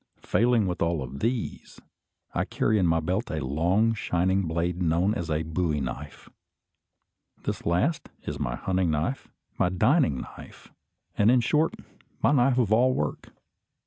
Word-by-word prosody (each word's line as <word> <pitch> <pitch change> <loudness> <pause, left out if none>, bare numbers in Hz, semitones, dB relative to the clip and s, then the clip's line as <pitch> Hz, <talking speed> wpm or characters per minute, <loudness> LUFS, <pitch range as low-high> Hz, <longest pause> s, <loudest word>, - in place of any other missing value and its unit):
Failing 120 -2 +2
with 90 -2 -3
all 85 -5 0
these, 110 - -4 0.5
I - - +1
carry 110 -1 +1
in 90 - +3
my 80 0 +3
belt 90 +4 -2
a - - -3
long 90 +11 +2
shining 95 -2 0
blade 85 +2 -1
known 85 +4 +2
as 85 -6 -4
a 80 +1 0
"bowie 80 -1 -1
knife." 65 +3 -6 1.2
This - - -4
last 90 - 0
is 70 -1 -5
my 60 -4 -2
hunting 95 +2 0
knife, 80 - -1 0.3
my 90 - +3
dining 95 - +2
knife, - - -12 0.5
and, 105 - +5
in 125 +1 +5
short, 155 +6 +1 0.4
my - - +3
knife 135 -2 +3
of 110 -4 +2
all 125 +3 +4
work. 75 -1 -3
90 Hz, 150 wpm, -26 LUFS, 80-115 Hz, 1.2 s, and